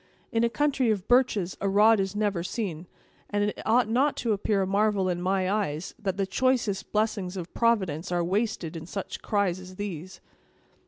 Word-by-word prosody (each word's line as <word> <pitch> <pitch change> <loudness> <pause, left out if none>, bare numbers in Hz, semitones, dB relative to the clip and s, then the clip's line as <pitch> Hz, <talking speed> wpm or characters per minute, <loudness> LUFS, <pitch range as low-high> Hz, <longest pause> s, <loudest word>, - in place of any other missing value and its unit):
In 225 0 +1
a 235 - +3
country 275 -2 +1
of 205 -3 -1
birches, 220 -7 +2
a 195 - +1
rod 210 +2 +5
is 195 +1 -1
never 205 -4 0
seen, 180 -3 -4 0.4
and 205 0 0
it 205 - -2
ought 235 +1 +4
not 260 +6 +2
to 230 -3 0
appear 200 0 +1
a - - 0
marvel 200 0 +2
in 175 -1 -1
my 185 0 +1
eyes, 185 -5 -1
that 195 -4 -2
the 195 - +1
choicest 230 -2 0
blessings 205 -3 -1
of 175 -1 -6
Providence 190 -8 +1
are 175 -1 +1
wasted 185 -3 -1
in 165 0 -7
such 195 +1 -5
cries 200 -4 0
as 185 0 -11
these." 185 -2 -6
200 Hz, 190 wpm, -27 LUFS, 185-220 Hz, 0.4 s, rod